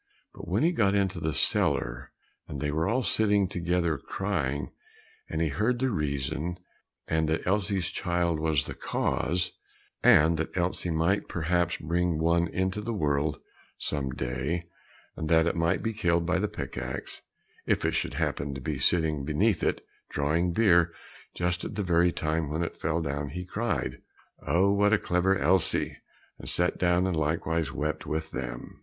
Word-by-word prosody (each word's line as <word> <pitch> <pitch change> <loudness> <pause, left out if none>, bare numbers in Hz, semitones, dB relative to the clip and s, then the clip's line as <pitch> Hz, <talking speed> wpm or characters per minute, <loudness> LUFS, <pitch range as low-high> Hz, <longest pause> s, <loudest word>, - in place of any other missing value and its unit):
But - - -10
when - - +1
he 170 - +4
got 100 - +2
into 100 -3 +1
the 80 -1 -1
cellar, - - 0 0.4
and 70 - -6
they 75 +1 -1
were 80 +2 0
all 130 +3 +1
sitting 105 -3 +2
together 85 -3 0
crying, 75 -7 -2 0.6
and 80 +1 0
he 80 - +1
heard 110 - +1
the 130 +1 0
reason, 75 - -2 0.5
and 80 -1 +1
that 80 - -1
Elsie's 95 -1 +1
child 85 -2 0
was 80 -3 +2
the - - -6
cause, 85 +2 -1 0.5
and 80 +2 +6
that 80 +3 -3
Elsie 90 0 0
might 85 +5 +1
perhaps 85 +1 0
bring 85 +1 0
one 85 +2 +2
into 95 +4 -1
the 115 +1 -3
world 75 -3 0 0.4
some 70 -3 -2
day, 65 +7 -2 0.5
and 80 - -4
that 80 -1 +5
it 85 - 0
might 85 +2 +1
be 115 - -1
killed 85 -5 +1
by 90 +2 +1
the 105 - +1
pick - - -5
axe, - - -5 0.5
if - - +1
it - - +2
should - - -1
happen 70 -1 -1
to - - -5
be 70 0 -3
sitting 75 -1 +2
beneath 85 +7 +1
it, - - 0 0.2
drawing 80 +5 +1
beer 85 -4 +4 0.4
just 90 0 -1
at - - -5
the 105 - -1
very 85 -1 +3
time 80 -1 -1
when 80 +3 -1
it 85 - -6
fell 80 +1 0
down, 70 0 -3
he 90 +5 -5
cried, 115 +6 -2 0.5
"Oh, 90 +7 +4
what 100 +1 +3
a - - +6
clever 95 +1 +1
Elsie!" 90 +3 +1 0.4
and - - -7
sat 90 0 0
down, 90 0 +3
and 95 -2 0
likewise 80 0 0
wept 75 +3 -3
with 80 0 -3
them. 60 -2 -6
85 Hz, 175 wpm, -28 LUFS, 75-95 Hz, 0.6 s, and